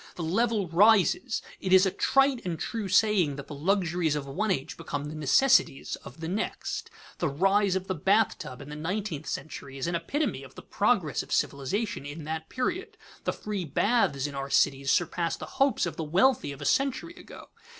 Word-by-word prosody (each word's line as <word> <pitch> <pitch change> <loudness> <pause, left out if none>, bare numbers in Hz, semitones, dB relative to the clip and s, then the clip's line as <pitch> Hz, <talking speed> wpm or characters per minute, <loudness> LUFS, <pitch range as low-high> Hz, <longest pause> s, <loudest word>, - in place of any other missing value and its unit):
The 175 - -5
level 205 +3 +1
rises; 210 - +3 0.2
it 190 - -3
is 190 +1 +7
a 190 - +1
trite 270 +5 +2
and 170 -3 -3
true 225 -3 -3
saying 200 -7 +3
that 140 -1 -7
the - - -9
luxuries 170 0 0
of 145 -2 -3
one 190 +11 -2
age 135 -8 -2
become 145 0 -5
the 150 - -6
necessities 155 - +3
of 150 +7 -13
the 160 - -3
next. 200 +6 -3 0.3
The 175 - +1
rise 195 +6 +2
of 190 0 -2
the 190 - -2
bath 200 +6 +2
tub 130 +2 -8
in 140 - -12
the 150 - -6
nineteenth 165 -1 -4
century 135 -1 -6
is 135 - -3
an 170 - -2
epitome 170 - -1
of 135 -2 -13
the - - -10
progress - - +1
of - - -12
civilization 140 - -1
in 145 +3 -7
that 160 +1 -5
period. 370 - -3 0.3
The - - 0
free 210 -3 -4
baths 165 - +1
in 145 - -4
our 135 0 -4
cities 140 -1 +2
surpass 170 +1 +1
the - - -7 0.2
hopes 275 -7 +3
of 175 - -5
the 160 - -2
wealthy 190 - +2
of 140 - -8
a - - -6
century 275 +5 0
ago. - - -13
175 Hz, 200 wpm, -28 LUFS, 145-210 Hz, 0.3 s, is